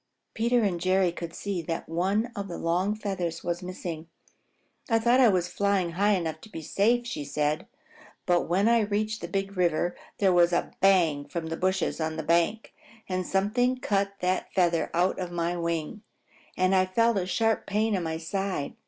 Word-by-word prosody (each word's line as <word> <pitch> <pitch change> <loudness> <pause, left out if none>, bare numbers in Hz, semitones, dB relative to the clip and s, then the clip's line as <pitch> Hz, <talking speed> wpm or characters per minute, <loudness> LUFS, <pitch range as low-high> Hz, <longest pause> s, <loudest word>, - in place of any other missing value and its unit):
Peter 235 +1 +2
and 180 -4 0
Jerry 185 0 +2
could 170 -1 -7
see 200 -4 -3
that 165 0 -4
one 195 +8 0
of 200 -1 -4
the 175 - -6
long 180 +5 0
feathers 185 -6 -3
was 175 +1 -2
missing. 175 -3 -6 0.8
"I 225 - +4
thought 240 +3 +3
I 255 - +7
was 180 -4 +2
flying 190 -1 0
high 200 +5 +2
enough 165 -5 -2
to 220 - -13
be 165 -6 -7
safe," 235 +9 +2
said - - -6
she, 150 -1 -2 0.6
"but 175 -2 +1
when 190 +5 +3
I 235 0 +5
reached 215 +1 -1
the 170 - -4
Big 195 +2 -3
River 175 -1 +1 0.2
there 195 -3 +3
was 175 0 +4
a 175 - 0
bang 170 -7 +3
from 170 -2 -4
the 165 - -2
bushes 185 -1 -1
on 160 0 -2
the 160 - -3
bank, 170 +8 +1 0.3
and 185 -1 -2
something 245 +6 +1
cut 200 -4 0
that 185 +1 -1
feather 170 -3 +2
out 180 +3 +1
of 180 -2 -4
my 170 0 -1
wing, 170 +3 -3 0.6
and 185 +1 +2
I 185 -1 +3
felt 230 +3 +2
a 180 - -3
sharp 225 +3 0
pain 215 +2 +1
in 190 - 0
my 160 -1 -3
side. 185 -2 -3
185 Hz, 190 wpm, -27 LUFS, 170-205 Hz, 0.8 s, I